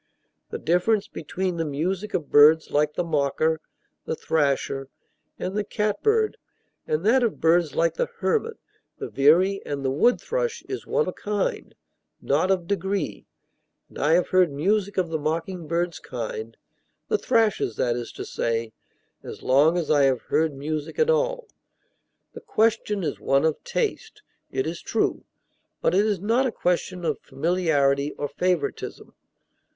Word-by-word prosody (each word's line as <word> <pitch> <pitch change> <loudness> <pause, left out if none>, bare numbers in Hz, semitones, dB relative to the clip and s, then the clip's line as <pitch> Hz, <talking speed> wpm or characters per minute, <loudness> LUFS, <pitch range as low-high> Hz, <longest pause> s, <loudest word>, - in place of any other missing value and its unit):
The - - -4
difference 195 +5 +1
between 180 +3 -4
the 165 - 0
music 175 +7 -2
of 155 -5 -3
birds 155 +2 +6
like 150 +1 +1
the - - 0
mocker, 155 0 0 0.4
the - - -2
thrasher, 140 -3 0 0.5
and 185 - -4
the 210 - 0
catbird 425 - 0 0.5
and 155 +4 -1
that 250 +4 +5
of 235 -4 0
birds 165 -2 +3
like 165 -1 +2
the - - -1
hermit, 315 - 0 0.4
the - - -5
veery, 180 +8 +4
and 140 -1 -4
the 130 - +1
wood 240 - +3
thrush 485 -1 -2
is - - -6
one 470 -1 +1
of - - -3
kind, 205 -1 -3 0.4
not 155 +7 +1
of 185 -3 +1
degree; 195 +1 -2 0.6
and - - -11
I 150 +3 +3
have 175 +1 +2
heard 185 -4 +4
music 195 +8 0
of 180 -3 +1
the 160 -1 -2
mocking 165 +3 -3
bird's 170 0 -1
kind 115 -2 -6 0.5
(the 430 -1 +1
thrasher's, 225 - +1
that 120 +1 0
is 120 -1 -5
to - - -6
say) 115 -1 -2 0.5
as - - -9
long 145 +6 +4
as 170 -3 -1
I 145 -2 +5
have 130 -3 +2
heard 160 -2 0
music 150 - -4
at 475 0 +3
all. - - 0 0.9
The - - -9
question 220 - +1
is 150 - -3
one 135 +2 +2
of 160 -2 0
taste, 425 -1 -3 0.3
it 395 - -1
is - - -4
true; - - -1 0.5
but - - +1
it 200 +3 +3
is 205 -4 0
not 230 +7 +2
a - - -2
question 180 -2 -1
of - - -1
familiarity 145 -4 +1
or 145 - -3
favoritism. 165 0 -2
170 Hz, 160 wpm, -25 LUFS, 145-205 Hz, 0.9 s, birds